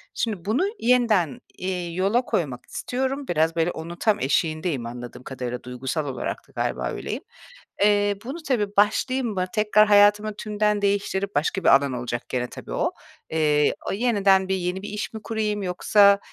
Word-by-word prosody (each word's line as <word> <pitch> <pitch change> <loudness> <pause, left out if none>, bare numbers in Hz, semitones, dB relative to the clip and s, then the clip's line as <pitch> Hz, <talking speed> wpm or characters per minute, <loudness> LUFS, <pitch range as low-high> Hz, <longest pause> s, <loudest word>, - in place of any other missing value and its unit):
şimdi 210 -7 -2
bunu 225 - +1 0.2
yeniden, 230 - +2 0.2
iii, 180 -2 -3
yola 200 +6 +2
koymak 145 - -2
istiyorum. 265 +2 -3
Biraz, 160 0 +1
böyle, 165 +1 +1
onun 165 +1 -7
tam 210 +4 +1
eşiğindeyim, 155 -2 0
anladığım 120 +1 -8
kadarıyla 125 -2 -5
duygusal 130 +5 -3
olarak 135 - -3
da - - -22
galiba - - -1
öyleyim. - - -5 0.6
Eee, 205 0 +3
bunu, 270 +7 -5
tabii, 210 -6 0
başlayayım 245 +5 +2
mı 185 -2 0
tekrar 215 0 +4
hayatımı 205 +1 +5
tümden 210 0 0
değiştirip 200 0 0
başka 170 +6 0
bir - - +5
alan 140 -1 +1
olacak 120 0 -4
gene 125 -1 -1
tabii - - -10
o. - - 0 0.4
Eee, 150 -2 +2 0.2
o - - -1
yeniden 200 -4 +3
bir 190 - +1
yeni 180 +1 -2
bir 205 - -6
iş 210 +2 -4
mi 220 - -5
kurayım? 215 -2 -2
Yoksa, 200 +2 +4
195 Hz, 165 wpm, -24 LUFS, 155-210 Hz, 0.6 s, hayatımı